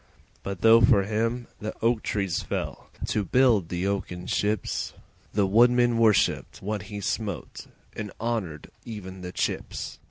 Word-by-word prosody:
But 100 -3 -5
though 115 +2 +7
for 100 -2 +5
him 115 +4 -1
the 110 - -5
oak 115 -1 +3
trees 95 -5 -1
fell - - -4 0.2
To 105 - +1
build 110 -4 +3
the 90 +1 -2
oaken 95 -3 -2
ships, 105 +3 -1 0.4
The 100 -1 +2
woodman 120 +3 +4
worshipped 110 -3 +2
what 105 +1 -3
he 105 -1 -5
smote 100 - -4 0.3
And 105 -1 -5
honoured 105 -10 -3
even 95 -4 -8
the 90 0 -6
chips. - - -3
105 Hz, 145 wpm, -26 LUFS, 95-115 Hz, 0.4 s, though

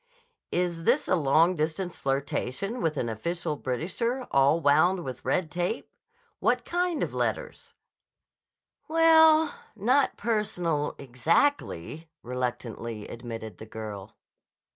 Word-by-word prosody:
"Is 175 -2 -1
this - - +3
a - - +2
long 165 +3 +3
distance 165 +3 -2
flirtation 140 - -2
with 155 -2 0
an 120 - -1
official 150 +8 -2
Britisher, 185 - -2
all 140 +4 +4
wound 160 - -13 0.3
round 175 - -7
with 130 -2 -6
red 170 -4 0
tape? 175 +7 -2 0.5
What - - +1
kind 350 -3 0
of - - -2
fetters?" - - -3 1.1
"Well, 320 -1 +6 0.2
not 255 +7 +2
personal, 180 -9 -1
exactly," 155 - 0
reluctantly 120 -3 -4
admitted 115 -4 -7
the 110 - -9
girl. 105 -2 -8
160 Hz, 115 wpm, -27 LUFS, 125-210 Hz, 1.1 s, Well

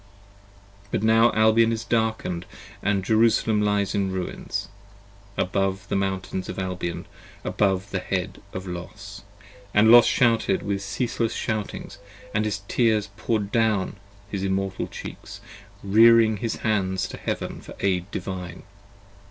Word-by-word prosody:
But 100 - -1
now 115 +1 +5
Albion 110 +1 +4
is 115 0 -2
darkened 110 -7 -1 0.3
& 100 -1 0
Jerusalem 110 0 +3
lies 105 -1 +1
in 100 -2 0
ruins: 95 -1 -4 0.7
55 - - +1
Above 95 +1 -1
the - - 0
Mountains 95 -1 -2
of - - -5
Albion, 90 -2 -3 0.4
above 100 -1 0
the 95 - -1
head 90 -1 -3
of 95 +1 -6
Los. 100 +3 -8 0.5
And 110 +2 +6
Los 120 0 +9
shouted 125 +10 +2
with 100 -1 -2
ceaseless 115 +3 -2
shoutings, 110 -2 -4 0.2
& 100 - -19
his 105 -2 -1
tears 110 -4 +2
poured 110 -2 -1
down 110 -4 +1 0.3
His 100 -1 -4
immortal 95 0 -1
cheeks, - - -9 0.4
rearing 110 +2 +6
his 115 +2 -2
hands 95 -4 +1
to - - -7
heaven - - -4
for - - -11
aid 95 -1 0
Divine! 90 -3 -6
100 Hz, 135 wpm, -24 LUFS, 95-110 Hz, 0.7 s, Los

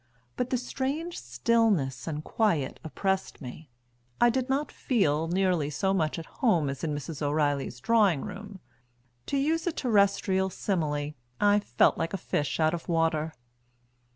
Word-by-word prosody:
But 250 0 -1
the 255 - +1
strange 275 +7 -3
stillness 140 - +1
and 155 -1 -3
quiet 165 - 0
oppressed 190 +4 -2
me, 140 +2 -9 0.5
I 240 0 +6
did 260 +1 -1
not 280 +3 0
feel 165 - +1
nearly 180 -4 +1
so 190 +6 0
much 155 -5 0
at 165 - -6 0.2
home 175 - +3
as 135 - -8
in 155 -2 -1
Mrs. 145 +1 -6
O'Reilly's 145 -3 0
drawing 200 - +3
room 205 -2 -8 0.7
to 280 - 0
use 320 +5 +1
a - - +2
terrestrial 200 -6 +2
simile, 150 -6 -1 0.3
I 205 0 +5
felt 120 - +2
like 165 +3 -1
a - - -2
fish 145 -4 -2
out 155 0 +3
of 170 0 -5
water. 160 -1 +1
175 Hz, 155 wpm, -28 LUFS, 150-225 Hz, 0.7 s, I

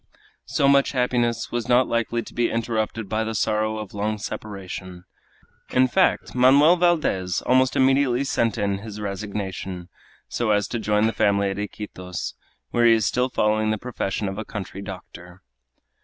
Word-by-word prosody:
So 140 - +2
much 140 0 +4
happiness 120 -2 0
was 120 0 -3
not 125 +1 +4
likely 115 0 -1
to - - -12
be 120 -1 +1
interrupted 115 -1 -2
by 110 +2 -1
the 110 0 -4
sorrow 110 +1 0
of 105 -3 -7
long 105 +1 -2
separation. 95 -4 -7 0.7
In 130 +1 +3
fact, 185 +8 +1
Manoel 140 +7 +6
Valdez 155 - +1
almost 130 0 +3
immediately 135 -1 +3
sent 115 -5 0
in 100 -1 -1
his 105 0 -8
resignation, 100 -3 -5 0.4
so 120 -2 -2
as 105 -2 +2
to 120 - -2
join 105 0 +2
the 110 - +1
family 100 -1 +2
at 95 - -5
Iquitos, 95 -3 -6 0.4
where 120 0 +4
he 115 - +7
is 110 -3 +2
still 125 +5 +1
following 110 -2 +1
the 110 - 0
profession 105 -3 -3
of 95 +2 -4
a - - -3
country 100 -3 -7
doctor. 90 -2 -10
110 Hz, 165 wpm, -23 LUFS, 100-120 Hz, 0.7 s, he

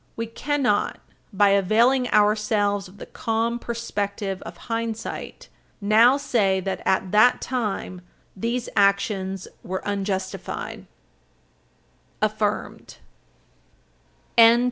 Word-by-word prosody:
We 230 - -3
cannot 250 -1 -1 0.3
by 205 0 +4
availing 230 +7 +3
ourselves 210 -1 +2
of 185 +2 -17
the - - -8
calm 230 +1 -2
perspective 205 -4 -4
of - - -9
hindsight 230 -1 -4 0.3
now 225 +5 +5
say 200 -9 +1
that, 190 +1 -3
at 190 -1 +1
that 215 +4 +5
time, 210 -7 -3 0.3
these 235 +5 -2
actions 200 -1 +1
were 190 +1 -5
unjustified. 195 -2 -4
210 Hz, 85 wpm, -24 LUFS, 195-230 Hz, 0.3 s, now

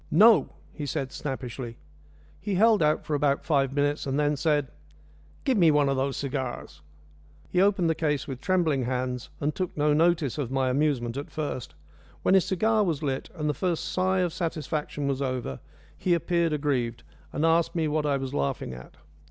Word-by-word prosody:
"No!" 215 +7 +6 0.2
he 145 -2 -5
said 135 0 -3
snappishly. 125 -4 -5 0.6
He 200 +1 -2
held 220 +1 +5
out 150 0 +2
for 155 - -3
about 140 -1 +1
five 140 -4 +2
minutes, 145 +1 0
and 135 +2 0
then 150 0 +2
said, 145 -2 +1 0.7
"Give 255 -6 +2
me 170 -3 +6
one 145 -2 +3
of 135 - +1
those 135 +1 -1
cigars." 130 - -4 0.7
He 180 - +3
opened 195 -3 +3
the 165 - +3
case 150 -2 -1
with 135 -2 -6
trembling 160 -8 +1
hands, 125 0 -2
and 150 +1 0
took 185 -4 -4
no 150 0 +3
notice 160 -3 +2
of 135 -5 -2
my 130 -1 +1
amusement 130 -4 0
at 140 - -5
first. 145 -5 -4 0.5
When - - +3
his 190 -2 +5
cigar 215 +3 +2
was 160 -5 -1
lit, 135 -2 -2
and 150 -3 -2
the 150 - +1
first 170 +3 -1
sigh 185 0 +1
of 175 -3 0
satisfaction 155 -3 -3
was 135 0 -1
over, 130 - -3 0.4
he 175 -2 +1
appeared 170 -1 +1
aggrieved, 125 -6 -1 0.3
and 150 +3 0
asked 165 +1 +2
me 160 -2 +1
what 150 0 0
I 140 -1 +2
was 135 -1 -5
laughing 70 -2 -2
at. 60 0 -12
150 Hz, 185 wpm, -27 LUFS, 135-165 Hz, 0.7 s, No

